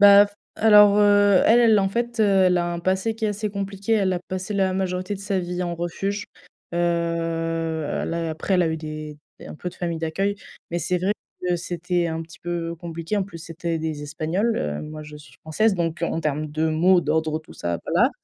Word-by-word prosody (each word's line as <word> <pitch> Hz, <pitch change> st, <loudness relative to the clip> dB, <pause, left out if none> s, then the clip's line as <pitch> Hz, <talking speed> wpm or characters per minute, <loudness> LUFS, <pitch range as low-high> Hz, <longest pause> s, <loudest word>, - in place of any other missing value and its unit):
Bah 205 Hz, 0 st, +9 dB
f 205 Hz, -, -18 dB, 0.2 s
alors, 210 Hz, -2 st, +7 dB
heu, 205 Hz, -2 st, +5 dB
elle 235 Hz, +2 st, +6 dB
elle 225 Hz, -3 st, +5 dB
en 195 Hz, -, +2 dB
fait, 235 Hz, +3 st, -2 dB
heu, -, -, +6 dB, 0.2 s
elle 180 Hz, -1 st, +3 dB
a 175 Hz, -, 0 dB
un 170 Hz, -, -4 dB
passé 190 Hz, +5 st, 0 dB
qui 225 Hz, -, -4 dB
est 215 Hz, -, +2 dB
assez 210 Hz, +1 st, -2 dB
compliqué. 200 Hz, +1 st, -3 dB
Elle 195 Hz, -4 st, +3 dB
a 180 Hz, -, 0 dB
passé 185 Hz, +3 st, -5 dB
la 190 Hz, -1 st, +2 dB
majorité 185 Hz, +1 st, -2 dB
de 195 Hz, -, -8 dB
sa 200 Hz, -1 st, -1 dB
vie 180 Hz, 0 st, -3 dB
en 175 Hz, -1 st, -2 dB
refuge. 195 Hz, +5 st, -3 dB, 0.5 s
Heu, -, -, -1 dB
là 165 Hz, -1 st, -1 dB
après 160 Hz, +5 st, -1 dB
elle 180 Hz, -, +4 dB
a 165 Hz, -, +1 dB
eu 160 Hz, -, -1 dB
des 155 Hz, -1 st, -7 dB, 0.2 s
des -, -, -11 dB
un -, -, -8 dB
peu 180 Hz, +3 st, -5 dB
de 180 Hz, -, -11 dB
famille 170 Hz, -2 st, -3 dB
d'accueil, 190 Hz, +6 st, -1 dB, 0.4 s
mais 175 Hz, -, -1 dB
c'est 180 Hz, +2 st, 0 dB
vrai 190 Hz, +4 st, +1 dB, 0.3 s
que 180 Hz, -1 st, 0 dB
c'était 175 Hz, 0 st, -1 dB
un 160 Hz, 0 st, -3 dB
petit 165 Hz, +2 st, -14 dB
peu 170 Hz, -1 st, -3 dB
compliqué. 165 Hz, +3 st, -4 dB
En 200 Hz, -, +2 dB
plus 185 Hz, -3 st, -9 dB
c'était 165 Hz, 0 st, -4 dB
des 155 Hz, -2 st, -4 dB
Espagnols, 160 Hz, +10 st, -1 dB
heu, 75 Hz, 0 st, -2 dB
moi, 155 Hz, 0 st, -7 dB
je 150 Hz, 0 st, -10 dB
suis 150 Hz, 0 st, -15 dB
française, 200 Hz, +7 st, +1 dB
donc 170 Hz, -1 st, -2 dB
en 165 Hz, -, 0 dB
termes 155 Hz, 0 st, -1 dB
de 155 Hz, +2 st, 0 dB
mots, 175 Hz, +4 st, +4 dB
d'ordres, 155 Hz, 0 st, 0 dB
tout 155 Hz, -, -15 dB
ça, 85 Hz, -1 st, -3 dB
voilà. -, -, +3 dB
175 Hz, 225 wpm, -23 LUFS, 160-200 Hz, 0.5 s, Bah